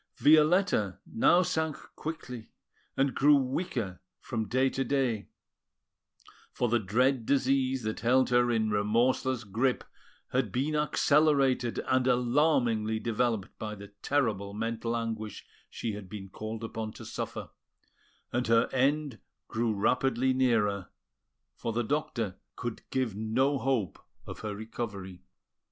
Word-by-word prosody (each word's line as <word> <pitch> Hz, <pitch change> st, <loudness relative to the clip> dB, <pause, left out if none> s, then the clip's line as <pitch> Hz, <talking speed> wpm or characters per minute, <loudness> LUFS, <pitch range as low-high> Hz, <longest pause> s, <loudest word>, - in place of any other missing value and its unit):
Violetta 155 Hz, -, +4 dB
now 175 Hz, +10 st, +4 dB
sank 160 Hz, -3 st, -1 dB, 0.2 s
quickly, 125 Hz, -7 st, -6 dB, 0.5 s
and 135 Hz, -1 st, +2 dB
grew 145 Hz, +2 st, +5 dB
weaker 125 Hz, -, -2 dB, 0.2 s
from 110 Hz, -4 st, -3 dB
day 130 Hz, +2 st, +2 dB
to 135 Hz, 0 st, -1 dB
day; 125 Hz, -8 st, 0 dB, 1.2 s
for 120 Hz, -, 0 dB
the 120 Hz, +1 st, +3 dB
dread 120 Hz, +5 st, +2 dB
disease 135 Hz, -2 st, +2 dB
that 110 Hz, 0 st, -3 dB
held 130 Hz, +2 st, +3 dB
her 120 Hz, 0 st, +4 dB
in 110 Hz, -2 st, +1 dB
remorseless 120 Hz, +4 st, +1 dB
grip 120 Hz, +6 st, 0 dB, 0.5 s
had 125 Hz, -5 st, 0 dB
been 140 Hz, +8 st, 0 dB
accelerated 145 Hz, -4 st, +3 dB
and 130 Hz, 0 st, +2 dB
alarmingly 120 Hz, -3 st, +2 dB
developed 115 Hz, -3 st, -1 dB
by 105 Hz, -1 st, -4 dB
the 100 Hz, 0 st, -11 dB
terrible 105 Hz, -8 st, 0 dB
mental 115 Hz, +1 st, -2 dB
anguish 110 Hz, -2 st, -4 dB, 0.2 s
she 115 Hz, -, -4 dB
had 100 Hz, -2 st, -8 dB
been 95 Hz, -1 st, -8 dB
called 110 Hz, +3 st, -6 dB
upon 110 Hz, -1 st, -4 dB
to -, -, -10 dB
suffer, -, -, -5 dB, 0.8 s
and 125 Hz, +1 st, 0 dB
her 115 Hz, +1 st, +4 dB
end 140 Hz, -2 st, +1 dB, 0.3 s
grew 115 Hz, 0 st, 0 dB
rapidly 125 Hz, +5 st, +1 dB
nearer, 110 Hz, -7 st, +1 dB, 0.6 s
for 115 Hz, -, -4 dB
the 120 Hz, +2 st, 0 dB
doctor 115 Hz, -7 st, -2 dB, 0.2 s
could 120 Hz, -3 st, -5 dB
give 130 Hz, -6 st, -1 dB
no 130 Hz, +6 st, +1 dB
hope 125 Hz, -10 st, -1 dB, 0.3 s
of -, -, -8 dB
her 105 Hz, -2 st, -4 dB
recovery. 100 Hz, -4 st, -6 dB
120 Hz, 130 wpm, -29 LUFS, 110-135 Hz, 1.2 s, grew